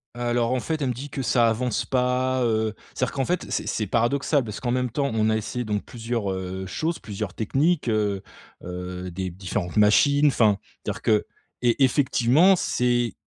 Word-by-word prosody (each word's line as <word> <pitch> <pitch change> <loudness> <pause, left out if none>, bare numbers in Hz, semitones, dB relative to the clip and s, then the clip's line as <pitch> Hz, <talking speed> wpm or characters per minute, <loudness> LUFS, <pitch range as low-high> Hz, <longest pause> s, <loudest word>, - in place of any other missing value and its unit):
Alors 120 0 0
en 130 - +1
fait, 160 +4 -3
elle 135 - 0
me - - 0
dit 135 +5 -7
que: 135 - -4
«ça 120 -2 +3
avance 120 +1 -1
pas, 130 +1 +1
heu,» 110 -2 +1 0.2
c'est-à-dire 130 - -1
qu'en 135 -1 -1
fait 180 +4 -1
c'est - - -2
c'est 110 - -1
paradoxal. 135 - +1
Parce 105 -3 -6
qu'en 120 - -2
même 125 0 0
temps, 140 +3 -1
on 110 -1 +2
a 110 - +2
essayé 120 +3 -4
donc 105 -1 -2
plusieurs, 115 -3 -3
heu, 95 0 -4
choses, 160 - -2
plusieurs 100 -2 -5
techniques, 145 - +1
heu, 105 -3 0 0.4
heu, 90 0 -6
des 95 +1 -3
b 90 - -13
différentes 95 0 -3
machines, 140 +8 +5
enfin 110 -7 +3 0.3
dire - - -4
que 105 -1 +2 0.4
et 120 +3 +3
effectivement 135 +6 +4
c'est 120 - 0
120 Hz, 190 wpm, -24 LUFS, 105-130 Hz, 0.4 s, machines